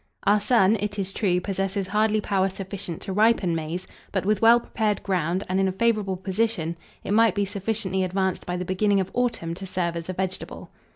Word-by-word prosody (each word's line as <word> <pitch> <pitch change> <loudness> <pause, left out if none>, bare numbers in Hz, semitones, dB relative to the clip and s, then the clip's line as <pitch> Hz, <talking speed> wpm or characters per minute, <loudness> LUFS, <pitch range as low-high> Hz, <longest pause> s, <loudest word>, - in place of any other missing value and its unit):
Our 205 +1 +4
sun, 215 -1 +4
it 205 0 -3
is 195 -1 -3
true, 180 -5 +1
possesses 195 +1 -2
hardly 215 +1 +2
power 195 -2 +1
sufficient 190 -3 -6
to 190 - -4
ripen 210 -4 +3
maize; 165 +3 -3 0.3
but, 190 -2 -1
with 210 0 +1
well 230 +1 +7
prepared 215 -3 -1
ground, 185 0 0
and 185 +1 0
in 195 - +3
a - - +1
favourable 205 -2 +1
position, 190 -3 -1 0.3
it - - -4
might 220 -2 +4
be 200 - +1
sufficiently 195 -1 -2
advanced 190 0 -1
by 180 0 -2
the 180 - -3
beginning 200 +2 +2
of 190 - -2
autumn 235 -9 -1
to 190 +3 -7
serve 175 -2 -1
as 170 +1 -5
a - - -1
vegetable. 190 0 -5
195 Hz, 205 wpm, -25 LUFS, 185-210 Hz, 0.3 s, well